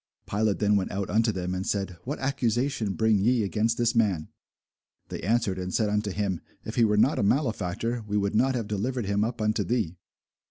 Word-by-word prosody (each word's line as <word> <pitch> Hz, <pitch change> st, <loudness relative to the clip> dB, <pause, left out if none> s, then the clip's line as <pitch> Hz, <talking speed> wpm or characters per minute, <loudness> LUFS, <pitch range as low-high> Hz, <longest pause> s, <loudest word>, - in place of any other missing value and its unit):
Pilate 105 Hz, 0 st, +1 dB
then 105 Hz, 0 st, +2 dB
went 95 Hz, -, -1 dB
out 100 Hz, -1 st, -3 dB
unto 110 Hz, +1 st, +3 dB
them, 90 Hz, -2 st, -3 dB
and 95 Hz, 0 st, -2 dB
said, 95 Hz, -3 st, -1 dB
What 140 Hz, +4 st, -3 dB
accusation 125 Hz, -4 st, 0 dB
bring 110 Hz, -1 st, +2 dB
ye 115 Hz, +3 st, +3 dB
against 110 Hz, +3 st, 0 dB
this 120 Hz, 0 st, +2 dB
man? 100 Hz, -9 st, +1 dB, 0.8 s
They -, -, -5 dB
answered 105 Hz, -2 st, +1 dB
and 90 Hz, 0 st, -4 dB
said 105 Hz, +3 st, +1 dB
unto 105 Hz, 0 st, 0 dB
him, 100 Hz, -3 st, -2 dB, 0.2 s
If 110 Hz, -, -5 dB
he 120 Hz, -, +3 dB
were 105 Hz, -1 st, +2 dB
not 135 Hz, +8 st, +3 dB
a -, -, +1 dB
malefactor, 115 Hz, -, 0 dB
we 105 Hz, 0 st, 0 dB
would 100 Hz, 0 st, 0 dB
not 130 Hz, +4 st, +2 dB
have 115 Hz, -4 st, -2 dB
delivered 115 Hz, +4 st, -2 dB
him 100 Hz, +1 st, +1 dB
up 115 Hz, +1 st, -3 dB
unto 110 Hz, 0 st, +1 dB
thee. 105 Hz, -8 st, -1 dB
105 Hz, 205 wpm, -27 LUFS, 100-115 Hz, 0.8 s, unto